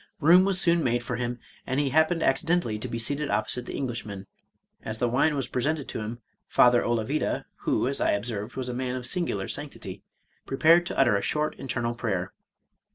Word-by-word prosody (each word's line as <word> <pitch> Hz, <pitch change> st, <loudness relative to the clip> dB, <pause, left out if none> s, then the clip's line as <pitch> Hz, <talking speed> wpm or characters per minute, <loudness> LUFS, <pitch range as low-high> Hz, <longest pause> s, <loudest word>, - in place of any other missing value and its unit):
Room 175 Hz, +4 st, +6 dB
was 195 Hz, -2 st, +3 dB
soon 170 Hz, -2 st, +4 dB
made 120 Hz, -1 st, +1 dB
for 125 Hz, 0 st, -3 dB
him, 120 Hz, 0 st, -2 dB, 0.3 s
and 130 Hz, +1 st, 0 dB
he 145 Hz, -2 st, +1 dB
happened 160 Hz, +3 st, +3 dB
accidentally 160 Hz, -6 st, +1 dB
to -, -, -4 dB
be 115 Hz, -, -4 dB
seated 140 Hz, +6 st, -1 dB
op 105 Hz, +1 st, 0 dB
posite 125 Hz, +2 st, -2 dB
the -, -, -6 dB
Englishman. 115 Hz, -7 st, -4 dB, 0.6 s
As 110 Hz, 0 st, -4 dB
the 120 Hz, -, +1 dB
wine 140 Hz, +6 st, +2 dB
was 135 Hz, -3 st, -1 dB
presented 145 Hz, +4 st, -1 dB
to -, -, -4 dB
him> 110 Hz, +2 st, -6 dB, 0.2 s
Father 120 Hz, -1 st, +5 dB
Olavida 120 Hz, +5 st, -1 dB, 0.2 s
(who, -, -, +1 dB
as 140 Hz, -, -2 dB
I -, -, +3 dB
observed, 105 Hz, +1 st, -4 dB
was 130 Hz, -1 st, -3 dB
a 125 Hz, -, -3 dB
man 125 Hz, 0 st, -2 dB
of 130 Hz, -, -4 dB
singu 170 Hz, -, -1 dB
lar 95 Hz, -, -4 dB
sanctity) -, -, -7 dB, 0.5 s
prepared 165 Hz, +5 st, +4 dB
to -, -, -5 dB
utter 125 Hz, -6 st, +4 dB
a 100 Hz, -, +1 dB
short 150 Hz, 0 st, -1 dB
internal 120 Hz, -3 st, -2 dB
prayer. 95 Hz, -6 st, -3 dB
125 Hz, 205 wpm, -27 LUFS, 115-150 Hz, 0.6 s, Room